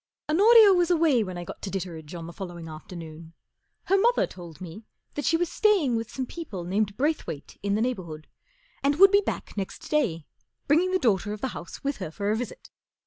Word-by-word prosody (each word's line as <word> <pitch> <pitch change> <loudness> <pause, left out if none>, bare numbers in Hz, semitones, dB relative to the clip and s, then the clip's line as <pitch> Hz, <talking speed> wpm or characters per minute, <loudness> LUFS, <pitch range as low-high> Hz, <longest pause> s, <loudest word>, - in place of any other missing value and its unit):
H 305 - -1
ONOR 420 +8 +6
IA 420 -3 +9
was 355 -1 +2
away 320 -9 +3
when 185 -3 -6
I 175 - -5
got - - -9
to 195 - -4
Ditteredge 175 -4 -6
oh 165 -1 -6
the 170 - -9
following 175 -3 -7
afternoon. 160 0 -10 0.5
Her 390 +1 +3
mother 475 +4 +3
told 170 -3 -11
me 185 +4 -9 0.3
that 290 - -4
she 330 - +3
was 350 +1 0
staying 365 - +2
with 225 -1 -3
some 260 - -4
people 250 - -7
named 200 +3 -1
Brayth 300 +5 0
wayt 145 -2 -8
in 200 0 0
the 220 - +1
neighbourhood, 170 -11 -4 0.6
and 280 +1 +2
would 390 0 +9
be 405 0 +5
back - - -5
next 195 -1 -5
day, 195 - +1 0.4
bringing 330 +6 +4
the 370 - +2
daughter 210 - +1
of 210 - -8
the 265 - -1
house 170 - -9
with 280 +1 -1
her 185 -5 -5
for 200 +6 -2
a - - +2
visit. 240 +2 -6
215 Hz, 220 wpm, -26 LUFS, -, 0.6 s, IA